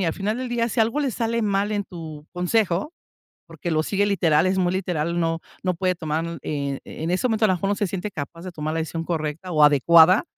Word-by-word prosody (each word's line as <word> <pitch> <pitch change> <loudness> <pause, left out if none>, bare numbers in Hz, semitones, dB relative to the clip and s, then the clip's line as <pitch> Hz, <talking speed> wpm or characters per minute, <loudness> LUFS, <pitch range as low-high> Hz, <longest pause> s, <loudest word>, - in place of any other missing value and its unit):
y 190 - +1
al 160 - +1
final 210 +3 -2
del 255 -1 -3
día, 235 -1 0
si 235 - -4
algo 230 +7 +2
le 275 -3 0
sale 230 0 -1
mal 205 0 0
en 205 -1 0
tu 155 -5 -9
consejo, 185 - 0 0.6
porque 175 - -5
lo 155 -1 +2
sigue 200 +4 +1
literal, 165 -5 +3
es 190 +1 +1
muy 180 -1 +1
literal, 175 -3 -1
no 165 -1 0 0.2
no 185 -1 +1
puede 185 +1 0
tomar, 165 +1 -3
eh, 140 -2 -3
en 160 +2 -5
ese 185 - 0
momento, 220 0 +2
a - - +4
lo 190 - +3
mejor, 195 +3 -2
no 205 - +1
se 200 0 -1
siente 195 +3 -4
capaz 160 +2 -7
de 185 - -6
tomar 155 -1 -4
la 165 - -1
decisión 165 +1 -4
correcta 165 +2 -3
o 155 -1 +5
adecuada, 160 - +6
180 Hz, 245 wpm, -23 LUFS, 160-205 Hz, 0.6 s, adecuada